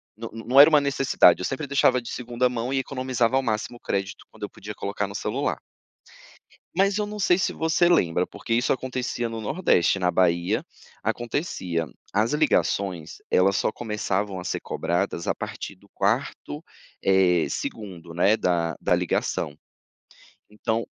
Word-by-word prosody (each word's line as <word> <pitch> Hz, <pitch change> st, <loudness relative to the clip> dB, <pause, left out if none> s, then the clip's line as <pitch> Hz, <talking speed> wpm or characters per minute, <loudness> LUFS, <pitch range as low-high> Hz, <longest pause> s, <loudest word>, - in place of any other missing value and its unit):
não 115 Hz, +1 st, -7 dB
não 115 Hz, +4 st, +2 dB
era 150 Hz, -, +9 dB
uma 150 Hz, -2 st, +6 dB
necessidade, 135 Hz, -10 st, +4 dB
eu -, -, -2 dB
sempre 135 Hz, +3 st, -3 dB
deixava 130 Hz, -2 st, +3 dB
de 120 Hz, -, -9 dB
segunda 125 Hz, 0 st, 0 dB
mão 125 Hz, 0 st, -3 dB
e 135 Hz, -, 0 dB
economizava 130 Hz, -2 st, 0 dB
ao 135 Hz, -, +4 dB
máximo 110 Hz, +1 st, -2 dB
o -, -, -23 dB
crédito 95 Hz, -3 st, -3 dB
quando -, -, -13 dB
eu -, -, -3 dB
podia -, -, -9 dB
colocar -, -, -3 dB
no -, -, -9 dB
celular -, -, -1 dB, 1.2 s
mas 195 Hz, +2 st, +3 dB
eu 210 Hz, -, 0 dB
não 210 Hz, 0 st, -7 dB
sei 180 Hz, -2 st, +4 dB
se 185 Hz, -, 0 dB
você 160 Hz, +2 st, +2 dB
lembra, 90 Hz, -, +3 dB
porque 105 Hz, +4 st, -10 dB
isso 120 Hz, +2 st, +2 dB
acontecia 125 Hz, -2 st, -3 dB
no 115 Hz, 0 st, -5 dB
Nordeste, 105 Hz, -, +2 dB
na 90 Hz, -, +2 dB
Bahia, 85 Hz, -1 st, +1 dB, 0.4 s
acontecia 110 Hz, -, -2 dB, 0.3 s
as 110 Hz, +6 st, +1 dB
ligações 95 Hz, -, 0 dB
elas 95 Hz, +1 st, +3 dB
só -, -, +1 dB
começavam 105 Hz, -4 st, -2 dB
a 90 Hz, -, -7 dB
ser -, -, -2 dB
cobradas 85 Hz, 0 st, -2 dB
a -, -, +1 dB
partir 100 Hz, -, -6 dB
do 100 Hz, +2 st, -23 dB
4º, 130 Hz, +9 st, -2 dB, 0.4 s
eh, 90 Hz, -3 st, +4 dB
segundo, 90 Hz, -6 st, -6 dB
né, 95 Hz, +5 st, +4 dB
da 85 Hz, -2 st, 0 dB
da -, -, +3 dB
ligação. 70 Hz, -, -1 dB, 1.1 s
Então. 115 Hz, +1 st, +1 dB
115 Hz, 165 wpm, -25 LUFS, 95-130 Hz, 1.2 s, era